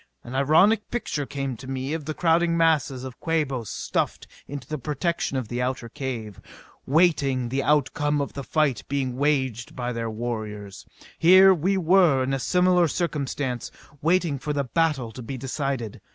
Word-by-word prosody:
An 120 Hz, -, -9 dB
ironic 160 Hz, +11 st, +3 dB
picture 150 Hz, -, -3 dB
came 135 Hz, -2 st, -3 dB
to 130 Hz, -, -11 dB
me 135 Hz, +2 st, -3 dB
of 160 Hz, -3 st, -4 dB
the 155 Hz, -, -4 dB
crowding 170 Hz, 0 st, +2 dB
masses 150 Hz, -6 st, +2 dB
of 130 Hz, -2 st, -8 dB
Quabos 140 Hz, -, -1 dB
stuffed -, -, -2 dB, 0.2 s
into 140 Hz, -3 st, -7 dB
the 155 Hz, -1 st, -4 dB
protection 150 Hz, +1 st, -2 dB
of 130 Hz, -4 st, -3 dB
the 120 Hz, +3 st, -3 dB
outer 125 Hz, -2 st, -2 dB
cave, 115 Hz, -6 st, -6 dB, 0.5 s
waiting 140 Hz, -5 st, +2 dB
the 135 Hz, +2 st, 0 dB
outcome 145 Hz, +1 st, +1 dB
of 140 Hz, -, -3 dB
the 140 Hz, -, -5 dB
fight 145 Hz, -6 st, +1 dB
being 135 Hz, -3 st, -2 dB
waged 130 Hz, -5 st, 0 dB
by 125 Hz, 0 st, -3 dB
their 115 Hz, -1 st, -3 dB
warriors. 110 Hz, -3 st, -5 dB, 0.3 s
Here 185 Hz, +3 st, +8 dB
were 185 Hz, +3 st, 0 dB, 0.4 s
we 130 Hz, -, +1 dB
in 135 Hz, +1 st, -1 dB
a 135 Hz, -, 0 dB
similar 180 Hz, +3 st, +3 dB
circumstance, 140 Hz, -6 st, -2 dB, 0.3 s
waiting 165 Hz, -3 st, +1 dB
for 150 Hz, +2 st, -3 dB
the 140 Hz, -1 st, 0 dB
battle 140 Hz, -4 st, 0 dB
to 125 Hz, -, -9 dB
be 130 Hz, +3 st, -6 dB
decided. 135 Hz, -3 st, -3 dB
140 Hz, 165 wpm, -25 LUFS, 125-160 Hz, 0.5 s, Here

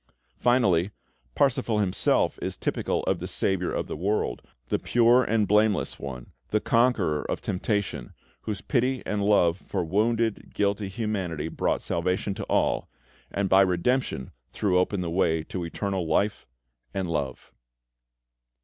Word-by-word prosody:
Finally, 100 Hz, -8 st, +3 dB, 0.5 s
Parsifal 120 Hz, -5 st, +2 dB
himself 100 Hz, -3 st, +1 dB
is -, -, -3 dB
typical -, -, -1 dB
of -, -, 0 dB
the -, -, -5 dB
Saviour 95 Hz, -2 st, 0 dB
of -, -, -2 dB
the -, -, -5 dB
world, 100 Hz, +7 st, -1 dB, 0.3 s
the -, -, +1 dB
pure 120 Hz, +1 st, +4 dB
and 110 Hz, -2 st, +1 dB
blameless 105 Hz, 0 st, +2 dB
One, 65 Hz, -3 st, -7 dB, 0.2 s
the 105 Hz, -, +2 dB
Conqueror 115 Hz, -11 st, +2 dB
of -, -, -1 dB
Temptation, 95 Hz, -, -2 dB, 0.3 s
Whose 100 Hz, -, -4 dB
pity 130 Hz, -1 st, 0 dB
and 105 Hz, -1 st, -1 dB
love 95 Hz, -5 st, +4 dB
for -, -, -3 dB
wounded, 110 Hz, +5 st, 0 dB
guilty 100 Hz, 0 st, 0 dB
humanity 95 Hz, -7 st, -3 dB
brought -, -, -1 dB
salvation 90 Hz, +4 st, -1 dB
to 105 Hz, +1 st, -5 dB
all, -, -, +1 dB, 0.4 s
and 100 Hz, 0 st, -1 dB
by 95 Hz, +1 st, +6 dB
redemption 95 Hz, -, 0 dB, 0.2 s
threw 95 Hz, -3 st, +1 dB
open 90 Hz, +1 st, 0 dB
the 85 Hz, -2 st, -3 dB
way 80 Hz, -3 st, +1 dB
to 90 Hz, +2 st, -5 dB
eternal 95 Hz, +1 st, -2 dB
Life 100 Hz, +6 st, 0 dB, 0.5 s
and 95 Hz, -2 st, -1 dB
Love. 75 Hz, -5 st, -3 dB
100 Hz, 140 wpm, -26 LUFS, 85-110 Hz, 0.5 s, by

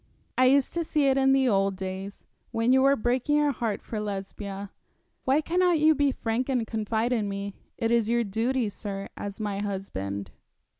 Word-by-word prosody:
I 255 Hz, -, +4 dB
used 270 Hz, +1 st, +4 dB
to 340 Hz, -, 0 dB
see 300 Hz, -2 st, +1 dB
it 265 Hz, -, +3 dB
in 270 Hz, 0 st, +4 dB
the 270 Hz, -1 st, +4 dB
old 195 Hz, -3 st, +2 dB
days, 190 Hz, +1 st, -6 dB, 0.3 s
when 230 Hz, +2 st, +1 dB
you 265 Hz, -, +5 dB
were 275 Hz, +1 st, +5 dB
breaking 250 Hz, +4 st, +1 dB
your 295 Hz, -1 st, +3 dB
heart 230 Hz, -5 st, -3 dB
for 220 Hz, -, -4 dB
Lesbia. 200 Hz, -1 st, -5 dB, 0.5 s
Why 270 Hz, +4 st, +3 dB
cannot 355 Hz, +1 st, +2 dB
you 310 Hz, +1 st, +5 dB
be 285 Hz, -1 st, +2 dB
frank 240 Hz, +1 st, -2 dB
and 250 Hz, -4 st, +1 dB
confide 220 Hz, +2 st, -1 dB
in 215 Hz, -4 st, 0 dB
me. 200 Hz, 0 st, -4 dB, 0.2 s
It 225 Hz, 0 st, 0 dB
is 230 Hz, -2 st, +2 dB
your 235 Hz, 0 st, +2 dB
duty, 230 Hz, +4 st, 0 dB
sir, 200 Hz, -1 st, -6 dB
as 200 Hz, +1 st, -6 dB
my 205 Hz, -2 st, -2 dB
husband.' 100 Hz, -, -4 dB
225 Hz, 190 wpm, -27 LUFS, 200-265 Hz, 0.5 s, you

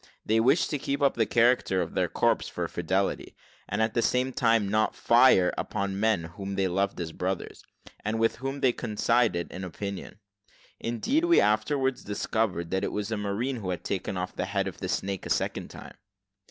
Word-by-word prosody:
They 110 Hz, +1 st, +3 dB
wished 135 Hz, +8 st, +3 dB
to 145 Hz, -, -1 dB
keep 140 Hz, +1 st, -2 dB
up 140 Hz, -, +4 dB
the 115 Hz, -2 st, +1 dB
character 120 Hz, -5 st, +3 dB
of -, -, -2 dB
their -, -, +1 dB
corps -, -, +1 dB
for -, -, -3 dB
fidelity, 95 Hz, +3 st, -1 dB, 0.3 s
and 105 Hz, +2 st, +1 dB
at 110 Hz, -1 st, 0 dB
the 120 Hz, -, +2 dB
same 125 Hz, +2 st, +1 dB
time 115 Hz, -4 st, +2 dB
not 110 Hz, +2 st, +1 dB
fire 120 Hz, -7 st, +5 dB
upon 100 Hz, -2 st, -2 dB
men 110 Hz, -5 st, +2 dB
whom 95 Hz, +4 st, -6 dB
they 95 Hz, -1 st, +1 dB
loved 100 Hz, +2 st, -1 dB
as 85 Hz, -2 st, -4 dB
brothers, 95 Hz, +3 st, -4 dB, 0.4 s
and 110 Hz, +2 st, -1 dB
with 115 Hz, 0 st, +2 dB
whom 135 Hz, +3 st, -4 dB
they 125 Hz, -2 st, +4 dB
coincided 115 Hz, -5 st, 0 dB
in 95 Hz, -, -6 dB
opinion. 100 Hz, +3 st, -6 dB, 0.6 s
Indeed, 235 Hz, -, 0 dB
we 345 Hz, 0 st, +5 dB
afterwards 130 Hz, +5 st, +1 dB
discovered 100 Hz, -4 st, -2 dB
that 95 Hz, 0 st, 0 dB
it -, -, -1 dB
was 105 Hz, +1 st, -3 dB
a -, -, +1 dB
marine 105 Hz, +6 st, -2 dB
who 100 Hz, -5 st, -5 dB
had 90 Hz, -, -3 dB
taken 95 Hz, -1 st, -3 dB
off 90 Hz, 0 st, -4 dB
the -, -, -2 dB
head 100 Hz, 0 st, -1 dB
of 95 Hz, -, -7 dB
the 95 Hz, -, -4 dB
snake 95 Hz, 0 st, -2 dB
a -, -, -8 dB
second -, -, -1 dB
time. -, -, -11 dB
105 Hz, 195 wpm, -27 LUFS, 95-120 Hz, 0.6 s, fire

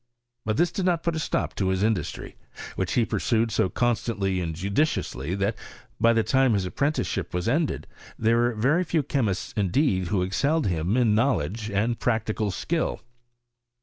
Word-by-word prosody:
But 110 Hz, 0 st, 0 dB
tliis 175 Hz, +2 st, +2 dB
did 185 Hz, 0 st, -1 dB
noC 170 Hz, -2 st, +1 dB
put 170 Hz, -1 st, 0 dB
a -, -, -1 dB
stop -, -, -1 dB
to 95 Hz, -, -1 dB
his 95 Hz, +1 st, +1 dB
industry, 105 Hz, -7 st, -2 dB, 0.4 s
which 95 Hz, -2 st, -2 dB
he 120 Hz, -, +3 dB
pursued 115 Hz, -1 st, 0 dB
so 95 Hz, -, +1 dB
constantly 105 Hz, -6 st, 0 dB
and 80 Hz, -2 st, -3 dB
judiciously, 95 Hz, -, -1 dB
that, 100 Hz, +3 st, 0 dB, 0.4 s
by 115 Hz, +1 st, +5 dB
the 115 Hz, -1 st, +2 dB
time 130 Hz, -1 st, +3 dB
his 100 Hz, -3 st, 0 dB
ap 90 Hz, -, -6 dB
prenticeship 140 Hz, -, -1 dB
was 90 Hz, +3 st, -1 dB
ended, 150 Hz, +5 st, 0 dB, 0.3 s
there 115 Hz, +1 st, +2 dB
were 120 Hz, 0 st, +2 dB
very 140 Hz, +11 st, +2 dB
few 165 Hz, -2 st, +1 dB
ehe -, -, -12 dB
55 140 Hz, -4 st, 0 dB
mists 100 Hz, -3 st, -3 dB
indeed 95 Hz, -, +1 dB
who 95 Hz, -1 st, +1 dB
excelled 145 Hz, -, +1 dB
him 90 Hz, +4 st, 0 dB
in 120 Hz, -4 st, +3 dB
knowledge 110 Hz, -, 0 dB
and 110 Hz, +3 st, 0 dB
practical 110 Hz, -2 st, 0 dB
skill. 160 Hz, -, -2 dB
110 Hz, 180 wpm, -25 LUFS, 95-135 Hz, 0.4 s, by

